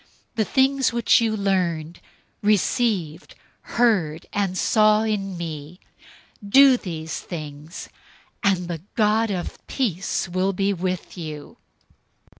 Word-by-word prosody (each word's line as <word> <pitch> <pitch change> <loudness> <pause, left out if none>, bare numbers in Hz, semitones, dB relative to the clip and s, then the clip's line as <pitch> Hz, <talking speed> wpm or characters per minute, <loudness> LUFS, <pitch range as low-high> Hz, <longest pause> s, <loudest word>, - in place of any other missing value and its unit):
004:009 - - -45
The 220 - +2
things 270 +1 +2
which 235 0 +4
you 220 -1 0
learned, 175 -5 -1 0.4
received, 205 -5 0 0.4
heard, 185 -10 +2
and 195 -2 -1
saw 215 +1 +4
in 195 -4 -2
me: 160 0 -7 0.6
do 265 +6 +7
these 160 -8 -5
things, 155 -1 -8 0.5
and 185 -3 +1
the 170 -3 -5
God 220 +1 +2
of 180 -3 -4
peace 195 - -1
will 185 +2 0
be 195 +2 +1
with 185 0 -4
you. 155 -3 -8
190 Hz, 115 wpm, -23 LUFS, 170-215 Hz, 0.6 s, do